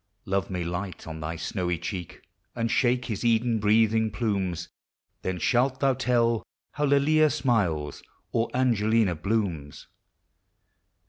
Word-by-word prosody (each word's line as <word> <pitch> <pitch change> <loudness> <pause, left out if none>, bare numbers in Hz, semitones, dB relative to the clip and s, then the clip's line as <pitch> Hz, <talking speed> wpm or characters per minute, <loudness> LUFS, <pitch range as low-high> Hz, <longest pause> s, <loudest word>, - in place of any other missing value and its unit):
Love 95 -1 -1
may 90 -2 -2
light 90 +1 -5
on 80 0 -7
thy 80 +2 -4
snowy 90 +1 -2
cheek, 90 -1 -6 0.3
And 115 -1 -1
shake 125 +1 +2
his 110 -3 -4
Eden 115 0 +2
breathing 110 +1 +3
plumes; 100 -5 -2 0.5
Then 95 -1 -2
shalt 130 +7 +1
thou 135 -1 +3
tell 120 -3 +1 0.3
how 150 - -1
Lelia 150 +2 +4
smiles, 90 - 0 0.3
Or 115 0 0
Angelina 115 -5 +2
blooms. 85 -5 -2
110 Hz, 125 wpm, -26 LUFS, 90-120 Hz, 0.5 s, Lelia